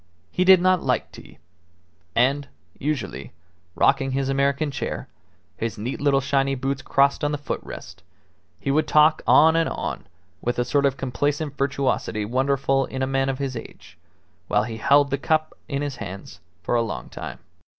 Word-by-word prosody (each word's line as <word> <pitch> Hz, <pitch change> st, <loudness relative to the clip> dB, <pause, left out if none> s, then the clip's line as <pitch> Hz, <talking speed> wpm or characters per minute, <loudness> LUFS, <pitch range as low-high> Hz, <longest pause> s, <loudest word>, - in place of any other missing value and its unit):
He 180 Hz, -, +1 dB
did 190 Hz, 0 st, +8 dB
not 185 Hz, 0 st, +3 dB
like -, -, -1 dB
tea; -, -, -14 dB, 0.8 s
and, 135 Hz, +4 st, +2 dB, 0.3 s
usually, 130 Hz, -, -3 dB, 0.4 s
rocking 135 Hz, -1 st, +2 dB
his 135 Hz, 0 st, 0 dB
American 140 Hz, +2 st, +1 dB
chair, -, -, -4 dB, 0.5 s
his 115 Hz, 0 st, -3 dB
neat 120 Hz, +7 st, -4 dB
little 140 Hz, -1 st, +3 dB
shiny 135 Hz, 0 st, +1 dB
boots 135 Hz, +1 st, -2 dB
crossed 140 Hz, +1 st, +2 dB
on 145 Hz, -, +1 dB
the 150 Hz, -, -1 dB
foot 145 Hz, -, -4 dB
rest, -, -, -10 dB, 0.6 s
he 135 Hz, -, -1 dB
would 155 Hz, +2 st, +2 dB
talk 155 Hz, +1 st, +5 dB
on 160 Hz, +1 st, +6 dB
and 165 Hz, 0 st, +2 dB
on -, -, -4 dB, 0.3 s
with 120 Hz, -, -1 dB
a 120 Hz, -, +1 dB
sort 140 Hz, +2 st, +2 dB
of 135 Hz, 0 st, -2 dB
complacent 145 Hz, +3 st, -2 dB
virtuosity 135 Hz, -6 st, -1 dB
wonderful 135 Hz, +3 st, +1 dB
in 130 Hz, 0 st, -3 dB
a -, -, +3 dB
man 135 Hz, 0 st, 0 dB
of 135 Hz, -, -2 dB
his 135 Hz, -2 st, -3 dB
age, 115 Hz, -, -10 dB, 0.5 s
while 105 Hz, 0 st, +2 dB
he 110 Hz, 0 st, -5 dB
held 140 Hz, +5 st, +4 dB
the 140 Hz, -, 0 dB
cup 155 Hz, +1 st, 0 dB
in 140 Hz, -1 st, -2 dB
his 140 Hz, -3 st, -4 dB
hands 100 Hz, -4 st, -8 dB, 0.2 s
for -, -, -1 dB
a 120 Hz, -, +3 dB
long 105 Hz, -, -4 dB
time. -, -, -7 dB
135 Hz, 175 wpm, -24 LUFS, 130-145 Hz, 0.8 s, did